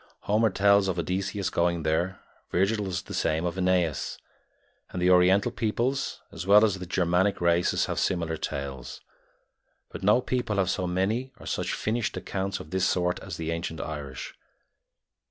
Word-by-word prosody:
Homer 110 Hz, +2 st, +2 dB
tells 100 Hz, 0 st, +4 dB
of 95 Hz, -2 st, -1 dB
Odysseus 95 Hz, +3 st, -2 dB
going 85 Hz, -1 st, +1 dB
there; 85 Hz, +4 st, 0 dB, 0.3 s
Virgil 100 Hz, +3 st, +1 dB
does 90 Hz, -3 st, -3 dB
the -, -, -9 dB
same 80 Hz, +2 st, 0 dB
of 85 Hz, -1 st, -2 dB
Aeneas; 90 Hz, -4 st, 0 dB, 0.7 s
and 90 Hz, -, -5 dB
the 90 Hz, +1 st, +4 dB
Oriental 95 Hz, +5 st, +5 dB
peoples, 125 Hz, +4 st, -1 dB
as 90 Hz, -, -7 dB
well 105 Hz, +2 st, +7 dB
as 100 Hz, -3 st, -1 dB
the 90 Hz, -, -7 dB
Germanic 90 Hz, +2 st, +1 dB
races, 85 Hz, 0 st, +2 dB
have -, -, -2 dB
similar 85 Hz, -3 st, 0 dB
tales; 70 Hz, -4 st, -5 dB, 0.9 s
but -, -, -7 dB
no 105 Hz, +5 st, +5 dB
people 125 Hz, -4 st, -1 dB
have 95 Hz, -1 st, +2 dB
so 90 Hz, -, -1 dB
many 105 Hz, +9 st, -1 dB
or -, -, -12 dB
such -, -, -2 dB
finished 115 Hz, +1 st, -1 dB
accounts 95 Hz, 0 st, -3 dB
of 75 Hz, -, -10 dB
this 95 Hz, 0 st, +1 dB
sort 90 Hz, 0 st, 0 dB
as 95 Hz, -4 st, -7 dB
the 80 Hz, 0 st, -3 dB
ancient 85 Hz, -1 st, -4 dB
Irish. 70 Hz, -4 st, -6 dB
95 Hz, 165 wpm, -27 LUFS, 85-100 Hz, 0.9 s, well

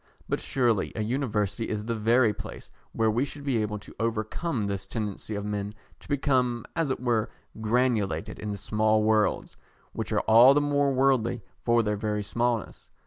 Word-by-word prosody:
But -, -, -1 dB
surely 120 Hz, -7 st, +1 dB
a 110 Hz, -, -1 dB
University 110 Hz, -3 st, -1 dB
is 105 Hz, -1 st, -3 dB
the 115 Hz, -, -1 dB
very 115 Hz, +1 st, +3 dB
place 110 Hz, 0 st, -9 dB, 0.2 s
where 110 Hz, -1 st, +1 dB
we 120 Hz, +4 st, +1 dB
should 145 Hz, 0 st, -7 dB
be 130 Hz, -6 st, +1 dB
able 105 Hz, 0 st, -2 dB
to 105 Hz, -, -13 dB
overcome 115 Hz, +3 st, -1 dB
this 100 Hz, -1 st, -3 dB
tendency 105 Hz, -1 st, -4 dB
of 100 Hz, 0 st, -4 dB
men 105 Hz, 0 st, -3 dB, 0.2 s
to -, -, -17 dB
become, 130 Hz, -4 st, +1 dB
as 165 Hz, -4 st, 0 dB
it 130 Hz, -, -1 dB
were, 120 Hz, -3 st, 0 dB, 0.3 s
granulated 110 Hz, -7 st, 0 dB
into 105 Hz, -1 st, -4 dB
small 110 Hz, +2 st, +1 dB
worlds, 110 Hz, -1 st, +1 dB, 0.4 s
which -, -, -4 dB
are -, -, +2 dB
all 120 Hz, +5 st, +7 dB
the -, -, +5 dB
more 145 Hz, -1 st, +2 dB
worldly 130 Hz, -4 st, +2 dB, 0.2 s
for 120 Hz, -1 st, +3 dB
their 105 Hz, -1 st, -1 dB
very 105 Hz, 0 st, -2 dB
smallness. 120 Hz, +1 st, -2 dB
110 Hz, 175 wpm, -27 LUFS, 105-125 Hz, 0.4 s, all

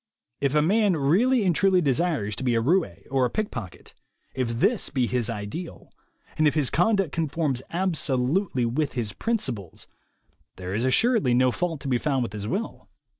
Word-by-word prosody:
If 140 Hz, +1 st, 0 dB
a 150 Hz, -, +4 dB
man 200 Hz, +1 st, +2 dB
really 210 Hz, -, +3 dB
and 180 Hz, -4 st, +2 dB
truly 190 Hz, 0 st, +4 dB
desires 140 Hz, -, 0 dB
to -, -, -4 dB
be 125 Hz, -2 st, +1 dB
a -, -, +3 dB
roue 165 Hz, +10 st, +2 dB, 0.2 s
or 135 Hz, -1 st, +2 dB
a 125 Hz, -, +2 dB
pickpocket, 125 Hz, -, -5 dB, 0.4 s
if 130 Hz, -2 st, -1 dB
this 230 Hz, -, +2 dB
be 130 Hz, -3 st, 0 dB
his 120 Hz, -1 st, -1 dB
ideal, 115 Hz, -, -6 dB, 0.5 s
and 155 Hz, -, +5 dB
if 150 Hz, -, +1 dB
his 145 Hz, -5 st, +2 dB
conduct 195 Hz, -2 st, +2 dB
conforms 155 Hz, -5 st, -1 dB
absolutely 155 Hz, -4 st, 0 dB
with 140 Hz, +5 st, -1 dB
his 115 Hz, -5 st, -3 dB
principles, 130 Hz, -, -3 dB, 0.7 s
there 90 Hz, 0 st, -6 dB
is 115 Hz, +5 st, 0 dB
assuredly 195 Hz, -, +3 dB
no 130 Hz, 0 st, +3 dB
fault 165 Hz, 0 st, -3 dB
to -, -, -6 dB
be 125 Hz, -2 st, +1 dB
found 135 Hz, -3 st, 0 dB
with 115 Hz, -, -5 dB
his 105 Hz, -1 st, -5 dB
will. 205 Hz, -, -4 dB
140 Hz, 175 wpm, -25 LUFS, 125-180 Hz, 0.7 s, and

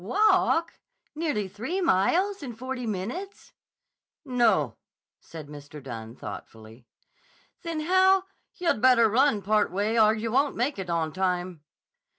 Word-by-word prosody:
Walk? 335 Hz, -, +2 dB, 0.3 s
Nearly 295 Hz, -10 st, -2 dB
three 230 Hz, -, -4 dB
miles 365 Hz, -, +2 dB
in 250 Hz, -5 st, -7 dB
forty 255 Hz, 0 st, -5 dB
minutes?" 235 Hz, -, -5 dB, 0.7 s
"No," 250 Hz, -3 st, +2 dB, 0.4 s
said 160 Hz, -2 st, -10 dB
Mr. 145 Hz, 0 st, -10 dB
Dunne 115 Hz, -4 st, -8 dB
thoughtfully. 110 Hz, +2 st, -10 dB, 0.7 s
"Then, 330 Hz, -3 st, -4 dB
how—" 375 Hz, +3 st, +4 dB, 0.3 s
"Yah'd 340 Hz, -11 st, 0 dB
better 250 Hz, -3 st, +6 dB
run 225 Hz, -1 st, +2 dB
part 215 Hz, +1 st, +2 dB
way, 210 Hz, +5 st, 0 dB
or 215 Hz, 0 st, +5 dB
yah 220 Hz, +1 st, -3 dB
won't 275 Hz, +4 st, +2 dB
make 250 Hz, 0 st, -1 dB
it 185 Hz, -2 st, -5 dB
on 165 Hz, -2 st, -1 dB
time." 180 Hz, -3 st, -2 dB
220 Hz, 130 wpm, -26 LUFS, 180-300 Hz, 0.7 s, better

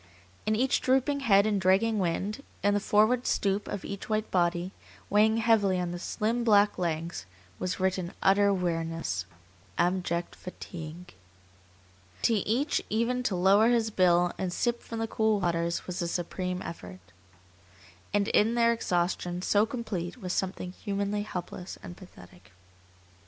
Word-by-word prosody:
In 215 Hz, -, +3 dB
each 255 Hz, +4 st, +1 dB
drooping 265 Hz, +2 st, +2 dB
head 200 Hz, -6 st, +4 dB
and 205 Hz, -2 st, +1 dB
dragging 200 Hz, +4 st, +3 dB
wing, 190 Hz, +3 st, -1 dB, 0.3 s
in 205 Hz, 0 st, +3 dB
the 205 Hz, -, +2 dB
forward 215 Hz, +5 st, +2 dB
stoop 200 Hz, +1 st, 0 dB
of 195 Hz, -, -5 dB
each 200 Hz, +2 st, -6 dB
white 215 Hz, 0 st, -1 dB
body, 175 Hz, 0 st, +1 dB, 0.4 s
weighing 220 Hz, +2 st, +4 dB
heavily 215 Hz, -5 st, +3 dB
on 175 Hz, -1 st, -2 dB
the 175 Hz, -, -5 dB
slim, 225 Hz, +6 st, -1 dB
black 205 Hz, -3 st, +4 dB
legs, 165 Hz, -, -3 dB, 0.3 s
was 185 Hz, +1 st, -2 dB
written 185 Hz, -1 st, 0 dB
utter 200 Hz, +1 st, +4 dB
weariness, 165 Hz, -, -2 dB, 0.5 s
abject 175 Hz, -1 st, 0 dB
fatigue. 175 Hz, -1 st, -9 dB, 1.1 s
To 230 Hz, -, +4 dB
each 230 Hz, +8 st, +1 dB
even 235 Hz, +3 st, 0 dB
to 220 Hz, -6 st, -1 dB
lower 195 Hz, +5 st, +5 dB
his 230 Hz, -2 st, +2 dB
bill 175 Hz, -2 st, +3 dB
and 185 Hz, -2 st, -1 dB
sip 240 Hz, +6 st, -1 dB
from 230 Hz, -, -7 dB
the 225 Hz, 0 st, -1 dB
cool 220 Hz, -1 st, +1 dB
waters 170 Hz, -2 st, -1 dB
was 180 Hz, 0 st, -4 dB
a 170 Hz, -, -1 dB
supreme 180 Hz, +1 st, -3 dB
effort. 90 Hz, -, -8 dB, 1.1 s
And 205 Hz, 0 st, +1 dB
in 225 Hz, +3 st, +3 dB
their 235 Hz, 0 st, +4 dB
exhaustion 175 Hz, -3 st, -1 dB
so 205 Hz, +3 st, +3 dB
complete 220 Hz, -6 st, -4 dB
was 185 Hz, -6 st, -4 dB
something 185 Hz, -1 st, -2 dB
humanly 200 Hz, +2 st, -2 dB
helpless 180 Hz, -2 st, -6 dB
and 175 Hz, -, -8 dB
pathetic. 100 Hz, -, -16 dB
195 Hz, 145 wpm, -28 LUFS, 175-220 Hz, 1.1 s, lower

